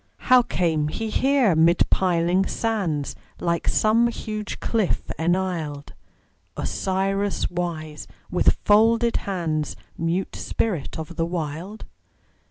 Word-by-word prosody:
How 255 -1 +9
came 160 -9 0
he 220 +8 -4
here 265 - +3
mid 165 +2 +4
piling 180 +1 +2
sands, 190 -11 -1 0.2
Like 170 -1 -1
some 225 +2 +3
huge 215 -3 -5
cliff 220 -5 -1
enisled, 165 -4 -1 0.6
Osiris 190 - -1
wise, 160 -4 -4 0.2
with - - +3
folded 225 +3 +4
hands, 165 -6 -2 0.2
Mute 170 +3 -1
spirit 185 -11 -2
of 160 +1 -7
the 165 - +1
Wild? 170 +5 -5
180 Hz, 105 wpm, -24 LUFS, 160-215 Hz, 0.6 s, How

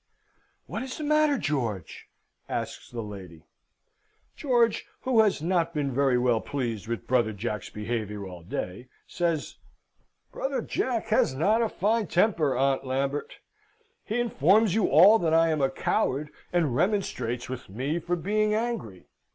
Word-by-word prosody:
"What - - -5
is 260 0 -6
the 310 - -5
matter, 305 -1 +3
George?" 120 - -3 0.4
asks - - -4
the 120 -2 -5
lady. 95 -6 -10 0.9
George, 240 -6 +1
who 255 -3 +2
has 200 -8 +1
not 170 -1 0
been 140 -3 -1
very 135 -1 +3
well 120 -2 +2
pleased 115 -7 -3
with 115 -4 -4
brother 120 -3 +2
Jack's 105 0 -4
behaviour 105 -2 -4
all 90 -2 -10
day, 90 +7 -5 0.2
says: 170 -4 -2 0.7
"Brother 270 0 -2
Jack 230 -3 -2
has 215 -11 +2
not 210 - +2
a 225 - +1
fine 215 +1 0
temper, 170 - +2
Aunt 135 0 +1
Lambert. 135 +2 -3 0.6
He 225 +3 -2
informs 215 - +3
you 220 -1 +2
all 190 +10 +7
that 160 -2 +2
I 165 0 +4
am 155 -2 0
a 135 - +3
coward, 140 +2 -1 0.2
and 160 -8 +1
remonstrates 130 - -1
with 130 -4 -7
me 135 - -2
for 175 +2 -1
being 210 +4 +1
angry. 215 - -3
150 Hz, 150 wpm, -27 LUFS, -, 0.9 s, all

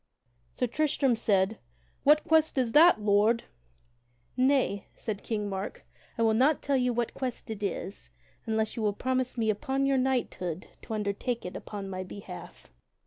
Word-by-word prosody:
Sir - - +1
Tristram 275 0 +1
said, 205 -1 +1 0.4
"What 300 +2 +5
quest 315 -2 +3
is 250 -3 +1
that, 325 +1 +7
Lord?" 210 +3 +3 0.9
"Nay," 255 -6 +2
said 210 -3 -4
King 210 -2 -2
Mark, 195 0 -5 0.3
"I 230 - +1
will 220 -1 +4
not 270 +7 +3
tell 280 - +1
you 250 -1 +2
what 240 -1 -1
quest 250 -3 -4
it 215 -2 -6
is 195 -1 -4 0.4
unless 220 -1 0
you 230 - -3
will 210 -1 +1
promise 255 +2 -1
me 220 -2 +2
upon 265 +6 -1
your 275 -1 +3
knighthood 230 -10 -1 0.2
to 225 - -5
undertake 215 +3 -2
it 180 - -6
upon 200 -2 -6
my 185 -1 -4
behalf." 185 - -10
230 Hz, 160 wpm, -29 LUFS, 205-260 Hz, 0.9 s, that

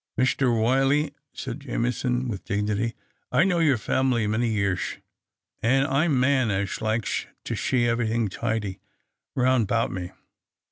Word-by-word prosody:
" - - -48
Mister 130 +1 +2
Wy'Fly," 135 +6 +2 0.2
said 130 0 -6
Jameson, 125 -1 -1
with 100 -5 -4
dignity, 105 +3 -1 0.2
" - - -47
I've 170 - +4
know 180 -3 +2
your 150 -6 +4
family 125 0 +1
many 110 +3 +1
yearsh, 100 -4 -1 0.6
and 135 +4 +3
I'm 140 0 +2
man 130 -2 +3
as 100 0 -1
liksh 110 -3 -1 0.2
to - - -3
sliee 120 -2 +1
ev'rythin' 115 -1 +1
tidy 110 -2 -2 0.6
roun' 130 -2 +3
'bout 115 +3 0
me. 90 -1 -4
120 Hz, 145 wpm, -25 LUFS, 110-130 Hz, 0.6 s, I've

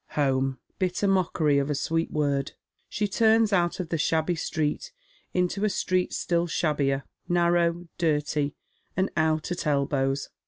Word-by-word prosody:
Home! 135 -2 +1 0.2
bitter 185 +2 0
mockery 170 -6 +2
of 140 +1 -1
a 145 - 0
sweet 165 +3 -1
word. 140 -2 -1 0.4
She 210 0 -1
turns 220 +1 +3
out 175 -2 +1
of 175 -3 -4
the 165 - -1
phabby 160 +2 +1
street 155 - -2 0.4
into 180 +3 0
a 215 - +3
street 185 -1 0
still 170 0 0
shabbier, 140 -4 0 0.3
narrow, 175 0 +2
dirty, 150 -3 0 0.4
and 190 +1 +1
out 155 +1 +1
at 175 -2 -3
elbows. 140 -1 0
165 Hz, 145 wpm, -26 LUFS, 145-180 Hz, 0.4 s, turns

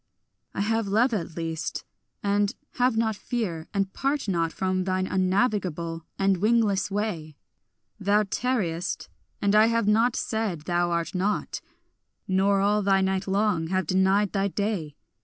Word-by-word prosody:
I - - -1
have 225 +1 0
love 230 +5 +2
at 170 -5 -3
least, 165 -1 -3 0.4
and 205 +3 +1 0.2
have 250 -2 +3
not 220 -1 +1
fear, 195 -9 -3
and 195 -1 -1
part 275 -2 -1
not 170 -4 0
From 185 0 -1
thine 185 0 0
unnavigable 185 -4 0
and 195 -1 +2
wingless 210 -1 +2
way; 195 -7 -3 0.6
Thou 205 +1 +3
tarriest, 195 -6 -2 0.3
and 200 0 +3
I 215 +1 +6
have 230 -2 +1
not 225 +3 +3
said 220 -8 -2
thou 175 +2 0
art 170 -1 -1
not, 195 +3 -1 0.7
Nor 195 +1 +2
all 205 +1 +2
thy 195 -1 +3
night 190 0 0
long 195 -4 +1
have 185 +2 0
denied 190 +2 +2
thy 195 -1 +1
day. 195 -7 -2
195 Hz, 145 wpm, -26 LUFS, 185-215 Hz, 0.7 s, I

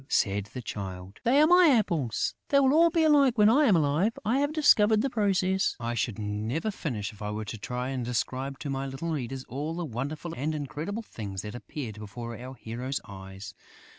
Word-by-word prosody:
said 100 0 +1
the 125 - -5
Child. 95 -2 -7
"They 255 +5 +4
are 305 - +7
my 355 +1 +7
apples! 170 - +1 0.2
They 280 - +5
will 270 0 +4
all 335 +2 +6
be 330 -1 +2
alike 280 -5 +5
when 210 0 +6
I 290 +5 +5
am 210 -8 +5
alive! 160 +8 +2
I 240 +5 +2
have 285 +1 +1
discovered 220 -9 +5
the 270 - -1
process!..." 190 -3 +1
I 120 0 -2
should 115 -1 -1
never 110 - -2
finish 115 - -4
if 105 - -16
I 105 - -3
were 105 +1 -4
to 110 +1 -6
try 125 +4 -3
and 130 -2 -3
describe 130 +3 -2
to 145 - -4
my 135 0 -2
little 135 +5 -5
readers 135 -3 -4
all 145 +7 -4
the 175 0 -3
wonderful 145 +6 -4
and 155 +4 -2
incredible 155 - -4
things 100 - -6
that 105 - -6
appeared 120 -3 -7
before 115 +3 -7
our 125 +3 -8
hero's 125 +3 -4
eyes. 95 +1 -9
135 Hz, 205 wpm, -28 LUFS, -, 0.2 s, are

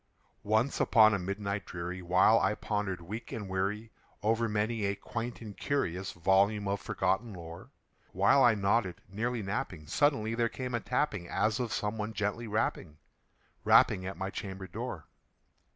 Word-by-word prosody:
Once 110 +6 +1
upon 110 -2 +6
a 100 - +1
midnight 100 +1 -3
dreary, 90 +1 -5
while 90 +6 +5
I 105 - +1
pondered, 105 -5 -2
weak 105 +8 -7
and 105 -3 -5
weary, 100 +4 -2 0.3
Over 115 +1 +2
many 105 +1 -1
a 100 0 0
quaint 115 +3 -5
and 105 -3 -8
curious 95 - -2
volume 100 +4 +2
of 100 0 -1
forgotten 110 +3 -1
lore 85 -1 -10 0.4
While 100 +9 +4
I 120 -2 +6
nodded, 100 -2 +1
nearly 115 +4 -2
napping, 95 - -4
suddenly 115 - +1
there 115 0 +1
came 125 0 -5
a 120 - +1
tapping, 115 -8 -1
As 110 +1 +1
of 120 -3 -2
some 110 0 -2
one 105 +1 -3
gently 105 +3 -2
rapping 100 -7 -2 0.7
rapping 95 - +5
at 95 -3 -6
my 95 +1 -3
chamber 95 -2 -6
door. 90 - -6
105 Hz, 160 wpm, -31 LUFS, 95-115 Hz, 0.7 s, upon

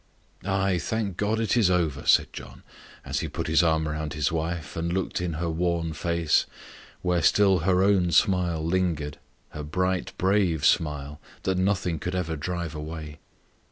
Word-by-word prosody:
"Ay, 95 -1 +1
thank 100 +3 -2
God 105 +4 0
it 115 -1 +1
is 110 -6 +4
over!" 80 -6 0
said - - +4
John, - - -10 0.4
as - - -2
he - - -3
put - - -4
his 80 -1 +4
arm 80 -2 +2
round 75 -1 -3
his 75 -2 0
wife, 80 -1 -3
and 85 +1 -2
looked 95 0 -2
in 90 -2 -2
her 85 +3 -2
worn 85 0 -1
face, 85 0 +1 0.6
where 90 -1 +1
still 95 +1 +4
her 90 +3 +2
own 95 -3 +3
smile 90 -4 +2
lingered 85 -4 -1 0.3
her 75 - -7
bright, 90 +4 -1
brave 95 -5 +2
smile, 75 -2 +1 0.2
that 95 -1 0
nothing 95 -4 0
could 90 +1 -3
ever 85 -3 -2
drive 85 +1 -4
away. 75 0 -7
85 Hz, 165 wpm, -26 LUFS, 80-95 Hz, 0.6 s, is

